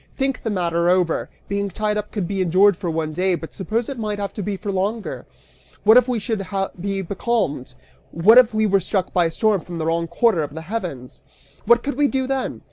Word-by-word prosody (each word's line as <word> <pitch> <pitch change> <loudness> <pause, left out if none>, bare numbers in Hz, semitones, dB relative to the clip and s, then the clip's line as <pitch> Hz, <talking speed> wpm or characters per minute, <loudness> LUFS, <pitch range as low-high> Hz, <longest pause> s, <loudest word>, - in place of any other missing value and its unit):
Think 270 -1 -1
the 225 - -3
matter 170 -3 0
over! 180 -2 +1 0.2
Being 200 0 -2
tied 210 +3 -1
up 210 0 -4
could 200 -5 -3
be 195 0 -2
endured 185 +3 +4
for 175 -1 -4
one 160 -1 -2
day, 185 +2 +1
but 165 -1 -8
suppose 220 +4 -2
it 275 -4 -6
might 210 -2 -2
have 200 -1 -4
to 210 - -5
be 200 0 -3
for 205 +1 -4
longer? 200 +4 -3 0.6
What 220 +2 +7
if 250 0 +6
we 250 -2 0
should 215 -2 -2 0.4
be 195 +1 -2
becalmed? 175 - -2 0.3
What 210 +9 +6
if 250 -3 +4
we 220 0 +1
were 195 -1 +3
struck 190 0 -2
by 175 -1 +3
a 165 - -1
storm 210 +1 +1
from 175 0 -8
the 160 - -2
wrong 165 +1 0
quarter 175 +1 +2
of 145 0 -5
the 160 - -5
heavens? 165 - -6 0.4
What 235 +2 +4
could 285 -2 -3
we 290 - +4
do 265 -1 -1
then? 270 0 -2
200 Hz, 225 wpm, -21 LUFS, 170-220 Hz, 0.6 s, What